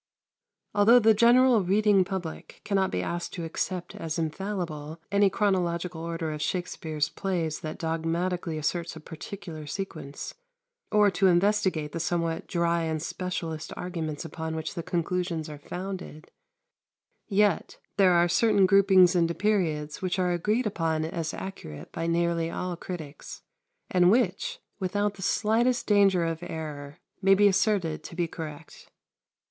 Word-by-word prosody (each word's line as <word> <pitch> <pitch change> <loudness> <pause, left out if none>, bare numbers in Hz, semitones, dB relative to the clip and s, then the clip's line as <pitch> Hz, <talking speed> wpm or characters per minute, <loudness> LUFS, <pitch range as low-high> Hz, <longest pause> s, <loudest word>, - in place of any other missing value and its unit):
Although 215 +4 +6
the 220 -2 +6
general 235 0 +5
reading 200 +1 +4
public 180 -3 -6
cannot 195 -2 +1
be 90 - -2
asked 175 - -4
to 170 - -5
accept 175 +2 -3
as 160 0 -4
infallible 165 -2 -4
any 200 0 +4
chronological 180 -4 0
order 165 -1 -3
of 150 -1 -5
Shakspere's 155 -2 -2
plays 170 -6 -2
that 155 0 -6
dogmatically 165 +1 -2
asserts 170 +3 -2
a - - -8
particular 160 0 -8
sequence, 155 -5 -6 0.6
or 210 -1 +5
to 190 +1 +3
investigate 185 -4 +2
the 165 - -4
somewhat 165 0 -1
dry 170 -1 +1
and 160 -1 -1
specialist 165 -1 -4
arguments 165 -3 -4
upon 160 0 -5
which 160 0 -4
the 170 - -4
conclusions 170 -1 -2
are 150 -1 -8
founded, 180 -1 -7 1.0
yet 205 -3 +1 0.2
there 190 -3 +5
are 175 0 +4
certain 205 +1 +4
groupings 190 -2 +6
into 170 -1 +2
periods 160 -8 0
which 185 0 -1
are 180 -1 +1
agreed 210 +8 0
upon 165 -6 0
as 160 -1 -3
accurate 80 - -8
by 165 - -3
nearly 170 0 +1
all 180 +1 -3
critics, 160 -4 -8 0.5
and 180 -1 +5
which, 480 - +1 0.2
without 205 +2 0
the 195 - -12
slightest 230 +5 +2
danger 195 -4 +4
of 165 0 -3
error, 150 -4 -6 0.2
may 195 0 +6
be 205 +1 +5
asserted 195 -5 +1
to - - -9
be 175 -1 0
correct. 155 -3 -9
175 Hz, 140 wpm, -27 LUFS, 160-195 Hz, 1.0 s, Although